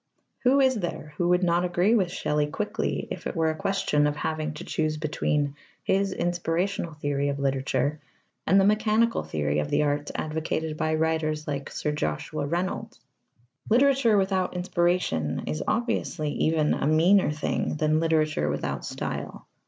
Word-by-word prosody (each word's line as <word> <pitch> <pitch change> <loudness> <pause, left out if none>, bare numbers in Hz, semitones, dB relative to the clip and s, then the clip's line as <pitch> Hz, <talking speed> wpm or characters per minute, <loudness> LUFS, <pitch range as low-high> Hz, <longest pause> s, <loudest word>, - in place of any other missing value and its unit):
Who 265 +2 +4
is 260 -1 +4
there 175 - -5
who 175 -1 +1
would 180 +1 +3
not 175 0 +2
agree 180 +4 +2
with 190 -7 +2
Shelley 150 -3 0
quickly 210 +8 -2
if - - -4
it - - -5
were 160 -1 +2
a - - -5
question 150 -5 +1
of 150 - -1
having 155 0 -3
to 160 - -7
choose 155 -2 -1
between 150 -2 -1 0.3
his 195 0 +1
inspirational 175 +1 -1
theory 145 -1 -1
of 140 - -2
literature 140 +2 0 0.5
and 195 - +5
the 195 - +4
mechanical 215 +2 +2
theory 75 -1 -1
of 75 0 -2
the - - +2
arts 145 0 -1
advocated 155 0 -2
by 155 0 0
writers 155 -1 0
like 140 -1 -3
Sir 150 - -2
Joshua 145 - -2
Reynolds? 175 +4 -3 0.7
Literature 250 -2 +4
without 190 -2 0
inspiration 175 - 0
is 75 0 -3
obviously 215 -9 -1
even 155 -1 +1
a - - -1
meaner 170 +5 +4
thing 150 0 -1
than 155 0 +2
literature 155 - +1
without - - -3
style. - - -5
160 Hz, 160 wpm, -26 LUFS, 150-185 Hz, 0.7 s, and